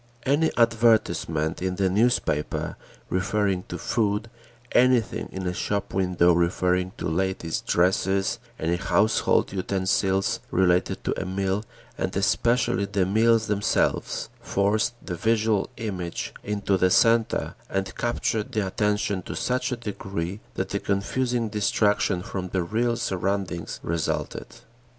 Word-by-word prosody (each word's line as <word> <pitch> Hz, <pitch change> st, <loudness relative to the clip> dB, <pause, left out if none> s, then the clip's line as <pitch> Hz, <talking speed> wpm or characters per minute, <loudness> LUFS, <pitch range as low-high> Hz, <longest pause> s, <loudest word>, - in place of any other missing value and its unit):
Any 145 Hz, +4 st, +3 dB
advertisement 110 Hz, -10 st, +2 dB
in 95 Hz, 0 st, -1 dB
the 95 Hz, 0 st, +1 dB
newspaper 100 Hz, -7 st, 0 dB, 0.4 s
referring 95 Hz, 0 st, 0 dB
to -, -, -4 dB
food, 110 Hz, 0 st, -1 dB, 0.4 s
anything 125 Hz, -3 st, +3 dB
in 95 Hz, 0 st, -5 dB
a 90 Hz, -, -1 dB
shop 100 Hz, +2 st, -2 dB
window 90 Hz, -2 st, +3 dB
referring 90 Hz, +2 st, +1 dB
to -, -, -3 dB
ladies' 85 Hz, -1 st, -1 dB
dresses, 95 Hz, +4 st, +1 dB, 0.2 s
any 85 Hz, +2 st, 0 dB
household 105 Hz, +2 st, +2 dB
utensils 95 Hz, 0 st, 0 dB
related 90 Hz, -1 st, +2 dB
to -, -, 0 dB
a -, -, -4 dB
meal, 95 Hz, +2 st, -1 dB, 0.4 s
and -, -, -2 dB
especially 120 Hz, -4 st, +2 dB
the 100 Hz, -2 st, 0 dB
meals 110 Hz, +3 st, +3 dB
themselves, 105 Hz, -1 st, 0 dB
forced 105 Hz, +4 st, +1 dB
the 90 Hz, -, -4 dB
visual 110 Hz, +2 st, +1 dB
image 95 Hz, -7 st, -4 dB
into 100 Hz, -1 st, 0 dB
the 95 Hz, 0 st, +3 dB
centre 115 Hz, +4 st, +3 dB, 0.2 s
and 95 Hz, 0 st, -2 dB
captured 115 Hz, -2 st, -1 dB
the 105 Hz, -2 st, 0 dB
attention 105 Hz, 0 st, 0 dB
to -, -, -7 dB
such 125 Hz, +1 st, -1 dB
a -, -, 0 dB
degree 100 Hz, -4 st, -4 dB, 0.2 s
that 95 Hz, +1 st, -3 dB
a 100 Hz, -, 0 dB
confusing 120 Hz, +5 st, -1 dB
distraction 105 Hz, -3 st, +1 dB
from 95 Hz, -2 st, -4 dB
the 95 Hz, -1 st, 0 dB
real 115 Hz, +6 st, 0 dB
surroundings 95 Hz, -3 st, -2 dB
resulted. 85 Hz, -1 st, -2 dB
100 Hz, 125 wpm, -25 LUFS, 90-110 Hz, 0.4 s, Any